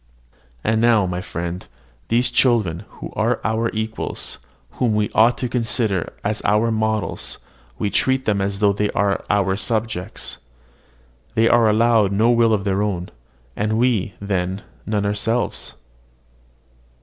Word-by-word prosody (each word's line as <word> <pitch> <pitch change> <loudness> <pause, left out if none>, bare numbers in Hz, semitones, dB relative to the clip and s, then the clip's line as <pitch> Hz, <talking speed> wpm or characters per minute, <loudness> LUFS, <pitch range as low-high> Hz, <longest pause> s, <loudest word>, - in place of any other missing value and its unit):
And 110 0 +1
now, 115 -4 +4
my 90 0 -3
friend, 85 -1 -5 0.4
these 120 +2 +2
children, 105 -8 +2
who - - -8
are - - +1
our 110 +1 0
equals, 110 0 -4 0.3
whom 115 -4 0
we 105 -1 0
ought 115 +3 +4
to 125 - -1
consider 115 -5 0
as 105 +1 -1
our 110 +2 +2
models, 110 -1 -1 0.4
we 105 -2 -1
treat 130 0 +1
them 100 -2 +1
as 100 0 -1
though 100 0 +3
they 105 +1 0
were 100 -1 +1
our 95 -2 +2
subjects. 110 -2 -3 1.0
They 115 0 +4
are 115 -2 +5
allowed 110 -2 +3
no 110 +4 +3
will 115 -1 +4
of 105 -2 +1
their 100 0 +1
own. 95 -4 -2 0.5
And 105 +1 0
have - - +1
we, 115 -6 +1
then, 95 -1 -2 0.2
none 105 -1 0
ourselves? 105 +4 -1
105 Hz, 145 wpm, -21 LUFS, 100-115 Hz, 1.0 s, are